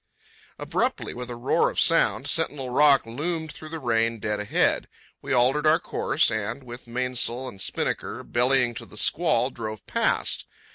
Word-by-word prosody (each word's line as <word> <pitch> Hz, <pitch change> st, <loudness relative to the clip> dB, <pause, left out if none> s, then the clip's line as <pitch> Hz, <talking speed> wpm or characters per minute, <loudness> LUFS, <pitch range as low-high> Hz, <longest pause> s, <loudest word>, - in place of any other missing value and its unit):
Abruptly, -, -, -2 dB
with 125 Hz, 0 st, -7 dB
a 120 Hz, -, -5 dB
roar 120 Hz, +2 st, +1 dB
of -, -, -3 dB
sound, -, -, +3 dB
Sentinel 135 Hz, -3 st, 0 dB
Rock 140 Hz, 0 st, +5 dB
loomed 160 Hz, +7 st, -3 dB
through 155 Hz, -, -10 dB
the 165 Hz, -, -5 dB
rain 115 Hz, -3 st, +1 dB
dead 105 Hz, -1 st, -2 dB
ahead. 105 Hz, -, +1 dB, 0.3 s
We -, -, -6 dB
altered 130 Hz, +5 st, +3 dB
our 155 Hz, +1 st, +6 dB
course, 170 Hz, -, +1 dB
and, 110 Hz, +4 st, -3 dB
with 120 Hz, 0 st, -10 dB
mainsail 125 Hz, +1 st, -1 dB
and 100 Hz, -6 st, -8 dB
spinnaker -, -, -2 dB
bellying 125 Hz, 0 st, +2 dB
to -, -, -8 dB
the 105 Hz, -, -10 dB
squall, 135 Hz, -3 st, +2 dB
drove 110 Hz, -3 st, -7 dB
past. -, -, 0 dB
125 Hz, 160 wpm, -25 LUFS, 115-140 Hz, 0.3 s, our